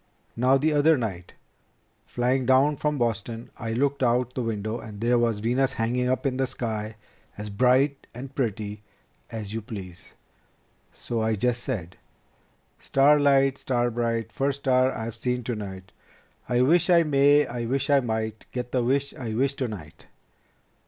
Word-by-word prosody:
Now 130 +3 +4
the 155 +3 +1
other 150 +2 +4
night, 95 -7 -5 0.7
flying 125 +1 0
down 135 +3 +4
from 150 +1 -1
Boston, 115 -1 -3
I 115 -1 -4
looked 140 +3 0
out 125 0 +1
the 130 - -2
window 110 0 -3
and 105 -2 -9
there 120 +2 +2
was 115 -3 0
Venus 125 +4 +1
hanging 125 +2 0
up 130 +3 -1
in 130 -2 0
the 135 0 +1
sky 110 -3 -4 0.4
as 105 0 -6
bright 130 +6 +2
and 130 +3 -9
pretty 105 -5 -3 0.5
as 110 -2 -6
you 115 - -3
please. 95 -6 -9 0.8
So 115 -2 -4
I 110 0 +1
just 120 +3 0
said, 95 -10 -5 0.8
'Star 145 +2 +4
light, 135 -1 +3
star 120 -2 0
bright, 115 -1 -2
first 140 0 -1
star 130 -1 +3
I've 115 -2 -5
seen 125 +1 -2
tonight, 100 -5 -6 0.6
I 125 0 +2
wish 165 +8 +3
I 170 -1 +6
may, 145 0 +4
I 120 -1 -4
wish 135 +4 -1
I 140 - +6
might 110 -3 -3
get 125 -1 -4
the 125 -2 +1
wish 140 +3 0
I 115 -4 -5
wish 135 +3 +1
tonight 100 - -6
125 Hz, 160 wpm, -25 LUFS, 110-135 Hz, 0.8 s, I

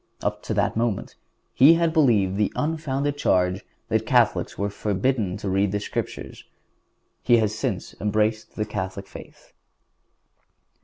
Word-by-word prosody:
Up - - -2
to - - -2
that - - +1
moment 115 -3 -1 0.4
he 145 +6 +7
had 165 -1 +1
believed 110 - +3
the 105 0 +1
unfounded 145 -2 -1
charge 90 -5 +1 0.3
that - - +1
Catholics - - +2
were 100 0 -2
forbidden 105 0 -1
to 100 - -6
read 95 +1 +1
the 105 - -1
Scriptures. 105 - -5 0.8
He 120 -1 +4
has 110 -2 +1
since 110 -5 -3
embraced 110 +1 0
the 105 - -1
Catholic 95 -1 -5
faith. - - -14
105 Hz, 140 wpm, -24 LUFS, 100-130 Hz, 0.8 s, he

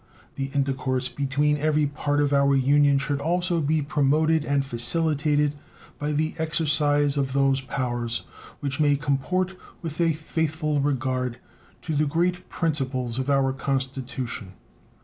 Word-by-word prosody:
The 135 0 -3
intercourse 130 -2 0
between 145 +2 0
every 150 0 +2
part 145 0 -1
of 145 -1 +1
our 140 0 +4
Union 140 +1 +4
should 140 0 -1
also 175 +2 +1
be 155 +1 +1
promoted 155 +2 +2
and 140 -2 0
facilitated 145 +4 +1 0.5
by 150 +1 -1
the 155 +1 0
exercise 150 -3 +2
of 135 -2 0
those 135 -1 +2
powers 120 -3 -2 0.4
which 140 0 -3
may 145 -1 +4
comport 150 +7 -1 0.3
with 165 0 -3
a 165 -1 +4
faithful 155 -1 -1
regard 130 -3 -1 0.5
to 160 - -2
the 150 +1 +2
great 175 +4 0
principles 130 -6 -1
of 130 +2 -2
our 135 -1 +2
Constitution. 130 -6 -3
145 Hz, 135 wpm, -25 LUFS, 135-155 Hz, 0.5 s, our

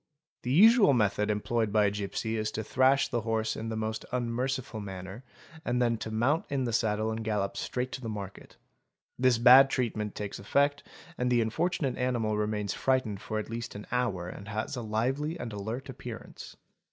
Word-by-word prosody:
The 125 - -3
usual 210 - +7
method 105 -3 +1
employed 110 +1 0
by 105 0 +4
a 100 - +2
gipsy 105 +2 -3
is 110 -1 -1
to 110 - -3
thrash 130 +4 +3
the 120 - -1
horse 110 0 -1
in 115 +1 -4
the 110 - -3
most 110 0 -3
unmerciful 125 0 -2
manner 95 +3 -7 0.4
and 125 -3 0
then 120 -2 +2
to 110 - -5
mount 120 +9 +1
in 140 -2 0
the 120 -2 -2
saddle 110 0 +1
and 110 0 -4
gallop 105 -3 -1
straight 125 +1 -3
to 130 - -6
the 115 - -4
market. 100 -2 -8 0.6
This 130 -2 +4
bad 130 +3 +8
treatment 110 -5 -2
takes 105 -1 -5
effect 140 +7 +1 0.4
and 125 0 +1
the 120 -1 +3
unfortunate 140 +3 -1
animal 120 -4 0
remains 105 -1 -1
frightened 130 -7 0
for 110 - -4
at 110 +1 -4
least 115 -1 -5
an 105 - -7
hour 115 -8 -1
and 100 +3 -9
has 110 +4 -3
a 125 - -4
lively 130 +9 -1
and 115 - -5
alert 110 +6 -5
appearance. 130 - -9
115 Hz, 190 wpm, -29 LUFS, 105-130 Hz, 0.6 s, bad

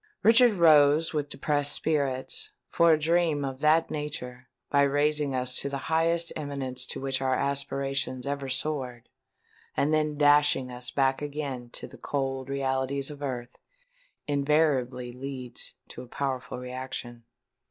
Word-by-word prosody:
Richard 230 +1 +6
rose 155 -3 +5
with 145 -2 -2
depressed 145 0 0
spirits; 140 -4 -1 0.2
for 170 0 +4
a - - +4
dream 160 -2 +1
of 135 -1 -5
that 155 +2 +3
nature—by 140 -2 -3
raising 145 0 +2
us 125 0 0
to 140 - -2
the 140 - -3 0.2
highest 165 +1 +2
eminence 135 -4 -4
to - - -4
which 135 0 -2
our 130 -1 +1
aspirations 140 -1 -1
ever 140 -1 -3
soared, 130 -3 -2 0.7
and 150 +2 +2
then 155 -1 +1
dashing 145 -3 +4
us 125 0 -2
back 135 0 +1
again 140 -4 -5
to - - -6
the - - -13
cold 135 -1 -3
realities 135 +1 -1
of 145 -1 -10
earth—invariably 145 - -2
leads 130 -1 -7
to - - -8
a 125 - -11
powerful 130 -1 -3
reaction. 125 -1 -6
140 Hz, 135 wpm, -27 LUFS, 130-150 Hz, 0.7 s, Richard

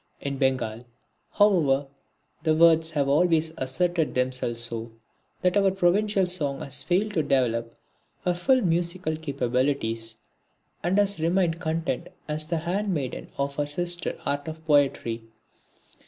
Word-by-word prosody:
In 140 -1 -4
Bengal, 130 -5 0 0.5
however, 160 -10 +3 0.6
the 155 -1 +2
words 165 0 +5
have 145 -3 0
always 160 +2 +3
asserted 165 +5 0
themselves 125 -2 0
so, 115 -1 -2 0.5
that 180 +1 +2
our 200 -1 +4
provincial 195 +2 +2
song 145 -7 -2
has 140 0 -1
failed 195 +7 0
to 160 - +2
develop 115 -5 0 0.5
her 180 - +2
full 255 +9 +2
musical 170 -2 0
capabilities, 125 -6 -1 0.7
and 180 +3 +1
has 200 -3 +2
remained 170 0 +1
content 165 -1 -2 0.2
as 155 0 -3
the 170 0 -1
handmaiden 170 -4 -2
of 140 0 -2
her 145 -1 0
sister 175 +3 -2
art 145 +1 -2
of 160 0 -8
poetry. 140 -6 +2
160 Hz, 130 wpm, -26 LUFS, 135-175 Hz, 0.7 s, words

